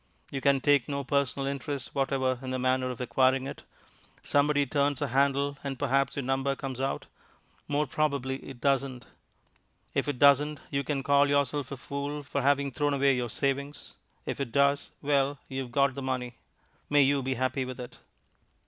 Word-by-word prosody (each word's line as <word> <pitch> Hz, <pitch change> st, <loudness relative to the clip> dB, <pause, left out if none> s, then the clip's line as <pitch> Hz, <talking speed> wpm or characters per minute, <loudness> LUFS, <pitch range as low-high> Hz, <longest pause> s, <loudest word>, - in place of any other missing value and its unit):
You 135 Hz, -, -3 dB
can 140 Hz, -1 st, +3 dB
take 145 Hz, -3 st, +3 dB
no 140 Hz, -1 st, -2 dB
personal 140 Hz, 0 st, 0 dB
interest 140 Hz, -1 st, -4 dB
whatever 130 Hz, -2 st, 0 dB
in 130 Hz, -, -6 dB
the 130 Hz, -, -1 dB
manner 130 Hz, 0 st, +1 dB
of 125 Hz, -, -6 dB
acquiring 130 Hz, +1 st, +2 dB
it. 140 Hz, -, -7 dB, 0.6 s
Somebody 145 Hz, 0 st, +3 dB
turns 140 Hz, +1 st, +1 dB
a -, -, -1 dB
handle, 140 Hz, +2 st, +1 dB
and 135 Hz, -2 st, -4 dB
perhaps 135 Hz, 0 st, +1 dB
your 140 Hz, -, -2 dB
number 135 Hz, +1 st, 0 dB
comes 135 Hz, -2 st, -5 dB
out. 135 Hz, +1 st, -2 dB, 0.6 s
More 145 Hz, +1 st, +1 dB
probably 135 Hz, -2 st, -1 dB
it 135 Hz, -2 st, -11 dB
doesn't. 135 Hz, -3 st, 0 dB, 0.9 s
If -, -, 0 dB
it 145 Hz, -3 st, -1 dB
doesn't, 145 Hz, +2 st, +5 dB
you 140 Hz, 0 st, 0 dB
can 140 Hz, -2 st, -2 dB
call 140 Hz, +1 st, +4 dB
yourself 140 Hz, -1 st, +1 dB
a 140 Hz, -, -4 dB
fool 140 Hz, +2 st, -4 dB
for 140 Hz, 0 st, -2 dB
having 140 Hz, 0 st, +2 dB
thrown 145 Hz, +1 st, 0 dB
away 140 Hz, -1 st, +3 dB
your 125 Hz, -1 st, -2 dB
savings; 140 Hz, +4 st, -2 dB, 0.3 s
if -, -, -4 dB
it 135 Hz, -4 st, -3 dB
does 140 Hz, +2 st, +2 dB
well, 140 Hz, 0 st, +2 dB
you 135 Hz, 0 st, -3 dB
have 125 Hz, -2 st, -7 dB
got 140 Hz, +1 st, +3 dB
the 140 Hz, -, -6 dB
money. 130 Hz, -2 st, -3 dB, 0.6 s
May 145 Hz, -1 st, +5 dB
you 140 Hz, +1 st, +2 dB
be 130 Hz, 0 st, -1 dB
happy 130 Hz, +1 st, 0 dB
with 130 Hz, -1 st, -7 dB
it! 125 Hz, -, -9 dB
140 Hz, 185 wpm, -29 LUFS, 130-140 Hz, 0.9 s, doesn't